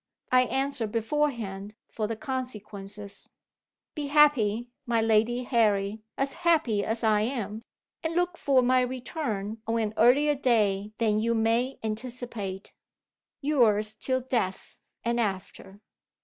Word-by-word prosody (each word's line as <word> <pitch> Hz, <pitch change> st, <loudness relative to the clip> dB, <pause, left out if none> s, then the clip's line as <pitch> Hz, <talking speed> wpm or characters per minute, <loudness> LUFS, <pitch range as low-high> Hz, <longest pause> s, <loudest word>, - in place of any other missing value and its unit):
I 255 Hz, 0 st, +5 dB
answer 270 Hz, -2 st, 0 dB
beforehand 225 Hz, -4 st, -2 dB
for 215 Hz, -2 st, -3 dB
the 225 Hz, -, -3 dB
consequences. 210 Hz, -6 st, -6 dB, 0.6 s
Be 295 Hz, -3 st, -4 dB
happy, 245 Hz, -6 st, +3 dB, 0.2 s
my 235 Hz, -1 st, +2 dB
Lady 225 Hz, +2 st, +2 dB
Harry 215 Hz, -4 st, +1 dB, 0.2 s
as 275 Hz, 0 st, 0 dB
happy 290 Hz, -12 st, +2 dB
as 225 Hz, +1 st, -2 dB
I 215 Hz, -2 st, +3 dB
am 220 Hz, -3 st, -3 dB, 0.4 s
and 325 Hz, 0 st, -3 dB
look 355 Hz, 0 st, +1 dB
for 270 Hz, -5 st, +3 dB
my 255 Hz, +1 st, +4 dB
return 245 Hz, -4 st, -3 dB
on 230 Hz, +1 st, 0 dB
an 215 Hz, -1 st, -1 dB
earlier 275 Hz, +6 st, +5 dB
day 210 Hz, -7 st, +1 dB
than 215 Hz, -2 st, +2 dB
you 230 Hz, +1 st, +1 dB
may 230 Hz, +4 st, +1 dB
anticipate. 220 Hz, -4 st, -4 dB, 0.7 s
Yours 220 Hz, -8 st, +2 dB
till 260 Hz, +4 st, -1 dB
death, 235 Hz, -7 st, -3 dB, 0.3 s
and 235 Hz, 0 st, +1 dB
after. 195 Hz, -1 st, -4 dB
230 Hz, 125 wpm, -27 LUFS, 210-260 Hz, 0.7 s, I